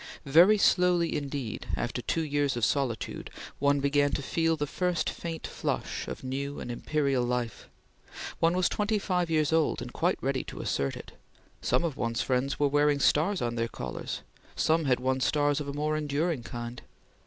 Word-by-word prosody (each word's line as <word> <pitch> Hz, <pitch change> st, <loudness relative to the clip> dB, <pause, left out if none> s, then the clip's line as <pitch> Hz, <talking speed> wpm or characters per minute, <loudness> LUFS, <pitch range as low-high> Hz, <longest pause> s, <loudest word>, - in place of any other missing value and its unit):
Very 170 Hz, +9 st, +7 dB
slowly, 180 Hz, -4 st, +3 dB
indeed, 140 Hz, -6 st, -4 dB
after 125 Hz, +1 st, -2 dB
two 165 Hz, +7 st, -1 dB
years 145 Hz, -3 st, 0 dB
of 115 Hz, -, +2 dB
solitude, 130 Hz, -6 st, -2 dB, 0.3 s
one 140 Hz, 0 st, +3 dB
began 145 Hz, +1 st, +3 dB
to 140 Hz, -, -1 dB
feel 165 Hz, +2 st, +1 dB
the 145 Hz, -, -1 dB
first 175 Hz, +2 st, -1 dB
faint 165 Hz, -1 st, -6 dB
flush -, -, -3 dB
of -, -, -6 dB
new 140 Hz, +2 st, -3 dB
and 120 Hz, -, -5 dB
imperial 140 Hz, 0 st, 0 dB
life. 120 Hz, -1 st, -3 dB, 0.7 s
One 165 Hz, +1 st, +3 dB
was 185 Hz, -, +3 dB
twenty 210 Hz, +1 st, 0 dB
five 180 Hz, -4 st, 0 dB
years 155 Hz, -1 st, +2 dB
old, 160 Hz, -2 st, +2 dB
and -, -, -7 dB
quite -, -, +1 dB
ready -, -, -1 dB
to -, -, -8 dB
assert 70 Hz, -1 st, -1 dB
it; -, -, -10 dB, 0.5 s
some -, -, +1 dB
of 160 Hz, -5 st, -2 dB
one's 115 Hz, -1 st, -1 dB
friends 130 Hz, +2 st, 0 dB
were 145 Hz, -, +4 dB
wearing 145 Hz, 0 st, +3 dB
stars 165 Hz, +6 st, +2 dB
on 120 Hz, -1 st, -1 dB
their 115 Hz, 0 st, -1 dB
collars; -, -, -5 dB, 0.3 s
some 160 Hz, 0 st, +2 dB
had 125 Hz, -2 st, +2 dB
won 130 Hz, +1 st, 0 dB
stars 145 Hz, +2 st, +2 dB
of 145 Hz, -, -5 dB
a 140 Hz, -, -4 dB
more 150 Hz, +1 st, 0 dB
enduring 150 Hz, 0 st, -1 dB
kind. 120 Hz, +1 st, -6 dB
145 Hz, 180 wpm, -29 LUFS, 130-165 Hz, 0.7 s, Very